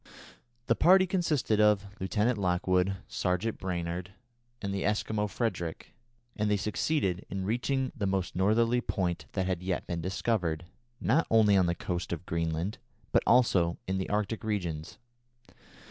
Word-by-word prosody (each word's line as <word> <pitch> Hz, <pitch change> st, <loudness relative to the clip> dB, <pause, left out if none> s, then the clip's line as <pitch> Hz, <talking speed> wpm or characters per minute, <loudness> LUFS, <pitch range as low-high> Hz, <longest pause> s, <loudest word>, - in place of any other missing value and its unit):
The -, -, +3 dB
party 185 Hz, +2 st, +6 dB
consisted 155 Hz, -, +1 dB
of 105 Hz, -2 st, +4 dB
Lieutenant 105 Hz, +4 st, 0 dB
Lockwood, 90 Hz, +1 st, +1 dB
Sergeant 90 Hz, +5 st, -1 dB
Brainard, 90 Hz, 0 st, -3 dB, 0.5 s
and 100 Hz, -1 st, -3 dB
the 100 Hz, -, -2 dB
Eskimo 105 Hz, 0 st, 0 dB
Frederick, 90 Hz, -8 st, -3 dB, 0.4 s
and 105 Hz, 0 st, 0 dB
they 105 Hz, -, +3 dB
succeeded 100 Hz, -, 0 dB
in 95 Hz, -1 st, -3 dB
reaching 130 Hz, +5 st, 0 dB
the 105 Hz, -6 st, -1 dB
most 95 Hz, -2 st, -1 dB
northerly 115 Hz, +6 st, +3 dB
point 90 Hz, -6 st, -2 dB
that 95 Hz, -2 st, 0 dB
had 90 Hz, -2 st, -1 dB
yet 90 Hz, -1 st, -2 dB
been 85 Hz, -1 st, -3 dB
discovered, 90 Hz, -3 st, -1 dB, 0.3 s
not 150 Hz, +9 st, +2 dB
only 110 Hz, -2 st, +5 dB
on 95 Hz, -2 st, +4 dB
the 85 Hz, -, 0 dB
coast 90 Hz, -1 st, -4 dB
of 85 Hz, +1 st, -4 dB
Greenland, 85 Hz, +4 st, -2 dB, 0.3 s
but -, -, +4 dB
also 95 Hz, -9 st, +4 dB
in 95 Hz, 0 st, -1 dB
the 95 Hz, -, -3 dB
Arctic 105 Hz, +1 st, -1 dB
regions. 85 Hz, -8 st, -3 dB
95 Hz, 145 wpm, -30 LUFS, 90-110 Hz, 0.5 s, party